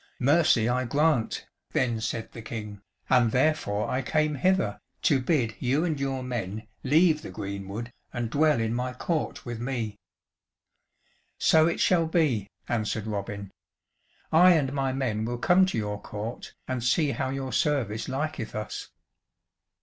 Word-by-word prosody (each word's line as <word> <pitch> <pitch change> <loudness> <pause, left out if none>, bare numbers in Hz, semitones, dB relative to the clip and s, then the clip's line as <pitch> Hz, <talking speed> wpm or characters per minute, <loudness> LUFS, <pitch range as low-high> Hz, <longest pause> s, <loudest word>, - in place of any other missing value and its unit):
"Mercy 135 -4 +4
I 125 +1 +1
grant," 145 -1 +1 0.3
then 120 -3 +1
said 110 0 -3
the 115 - -9
King, 105 -3 -7 0.3
"and 125 -3 +4
therefore 125 -7 +1
I 130 - 0
came 155 +3 +1
hither, 185 +7 +1 0.2
to 140 -6 +3
bid 125 -5 +1
you 135 +6 +1
and 155 -5 -1
your 135 -1 -2
men 110 -4 -4 0.2
leave 155 +3 +4
the - - -8
greenwood 100 +4 -6 0.2
and 120 -1 -2
dwell 150 -2 +3
in 115 0 0
my 125 +1 -2
court 155 +4 -2
with 120 -2 -5
me." 115 -4 -3 1.4
"So 160 0 +5
it 170 - -1
shall 170 -3 +3
be," 140 - +1 0.2
answered 110 -2 -1
Robin, 100 -2 -4 0.8
"I 180 +3 +7
and 140 -5 +1
my 135 -1 0
men 125 -5 -1
will 120 +2 -2
come 180 +9 +4
to 185 - -2
your 105 -1 -3
court, 110 +4 -6
and 130 -2 -2
see 140 +4 +2
how 130 -1 -2
your 135 -1 -4
service 115 -7 0
liketh 135 -5 -3
us." 105 0 -5
125 Hz, 150 wpm, -27 LUFS, 110-150 Hz, 1.4 s, I